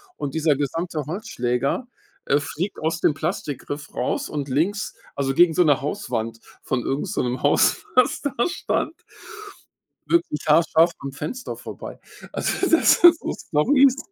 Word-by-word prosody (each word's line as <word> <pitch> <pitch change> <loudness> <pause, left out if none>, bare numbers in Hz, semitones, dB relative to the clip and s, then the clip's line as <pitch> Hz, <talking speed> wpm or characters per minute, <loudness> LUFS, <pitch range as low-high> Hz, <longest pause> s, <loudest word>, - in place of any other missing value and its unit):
Und 145 +1 -5
dieser 155 -2 +2
gesamte 155 +3 -2
Holzschläger, 140 - -2 0.4
äh, 145 - +3
fliegt 170 +7 -4
aus 160 +1 -2
dem 150 - +3
Plastikgriff 145 -2 -5
raus - - -2
und 145 -2 -4
links, 185 +10 -1 0.2
also, 135 -1 -1
gegen 170 +3 +5
so 180 - +4
'ne 145 -3 +3
Hauswand 120 - -3 0.2
von 125 -2 -1
irgend 135 +2 -2
so - - -1
'nem 125 +1 -3
Haus, 145 - +3
was 255 - +3
da 285 - -2 0.2
stand 355 - -2 1.1
wirklich 340 - +1
haarscharf 165 +2 +4
am 140 - -6
Fenster 155 - -5
vorbei. - - -9 0.3
Also, 375 - -1
das 330 - +5
sind 345 -1 +8
so - - -4
Stories, 265 - +3
155 Hz, 150 wpm, -23 LUFS, 140-200 Hz, 1.1 s, sind